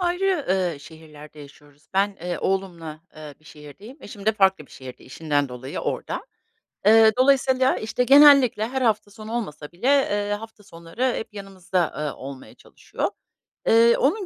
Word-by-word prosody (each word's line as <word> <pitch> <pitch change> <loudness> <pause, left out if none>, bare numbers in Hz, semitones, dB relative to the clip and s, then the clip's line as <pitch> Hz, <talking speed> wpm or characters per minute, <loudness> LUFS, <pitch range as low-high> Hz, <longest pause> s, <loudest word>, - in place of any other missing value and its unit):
ayrı, 355 -2 -1
eee, 180 -4 0
şehirlerde 150 0 -14
yaşıyoruz. 145 +1 -17
Ben, 200 +1 +1
eee, 175 0 -4
oğlumla, 170 -5 -4 0.2
eee, 150 -2 -10
bir - - -28
şehirdeyim. 155 - -13
Eşim 205 -3 -11
de 220 - +4
farklı 190 -7 +1
bir - - -26
şehirde. 130 -1 -12
İşinden 145 0 -2
dolayı 125 +2 -7
orada. - - -4 0.6
Eee, 220 +1 +6
dolayısıyla, 260 0 +3
işte, 225 +3 -2
genellikle 275 -5 +6
her 265 +2 -4
hafta 215 -4 0
sonu 215 +1 -9
olmasa 150 -11 -5
bile, 180 +9 -5
eee, 205 -8 +1
hafta 225 -1 -13
sonları 180 +9 -4
hep 220 - -7
yanımızda, 190 -3 -3
eee, 150 -1 -3
olmaya 135 0 -10
çalışıyor. - - -6 0.6
Iıı, 230 +1 +5
onun 380 +9 0
195 Hz, 155 wpm, -23 LUFS, 155-235 Hz, 0.6 s, Eee